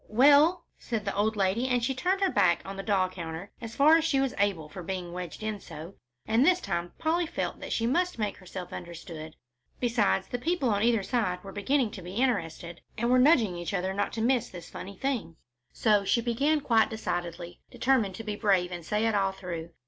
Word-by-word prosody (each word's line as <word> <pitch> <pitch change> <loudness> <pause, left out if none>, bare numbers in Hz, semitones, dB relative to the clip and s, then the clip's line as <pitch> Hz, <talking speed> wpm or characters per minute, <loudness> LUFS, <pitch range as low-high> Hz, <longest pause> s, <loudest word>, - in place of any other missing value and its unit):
"Well?" 290 +9 +5
said 225 -4 -3
the - - -1
old 215 +2 +1
lady, 200 +5 +1
and 250 -2 +1
she 265 - 0
turned 365 +9 0
her 385 -2 +3
back 180 -4 +3
on 195 - -6
the 195 - -4
doll 195 -2 +2
counter 175 +1 -7
as 230 -1 -7
far 305 +4 +6
as 330 - 0
she 310 -4 +2
was 270 -2 0
able 195 -7 +1
for 180 +5 -9
being 180 -1 -5
wedged 180 +3 -6
in 215 -1 -3
so, 165 0 -9 0.3
and 225 +3 +3
this 360 +4 +4
time 175 - -3
Polly 330 +2 0
felt - - -3
that - - -7
she 230 - 0
must 355 +8 +1
make 210 -2 -2
herself 185 -1 -8
understood. 165 -2 -8 0.4
Besides, 230 - +1
the 245 - -3
people 295 -3 0
on 200 -1 +1
either 230 -2 +3
side 185 -6 -1
were 195 - -8
beginning 225 +4 +1
to 190 - -8
be 180 +2 -8
interested, 170 -8 -1 0.2
and 235 +2 +1
were 255 - +5
nudging 250 - +4
each 175 +3 -3
other 190 +1 -1
not 205 +1 -1
to 225 - -3
miss 250 0 +2
this 175 -2 -10
funny 195 +1 -8
thing. 250 -11 -2 0.4
So 210 -3 +2
she 215 - +2
began 275 +6 +1
quite 225 -4 +3
decidedly, 175 -5 -4
determined 235 -8 +1
to 225 - -7
be 210 -1 -3
brave 190 -4 +2
and 175 -1 -6
say 210 +6 0
it 225 - +2
all 195 -2 +2
through. 170 -4 -6
210 Hz, 215 wpm, -28 LUFS, 180-250 Hz, 0.4 s, far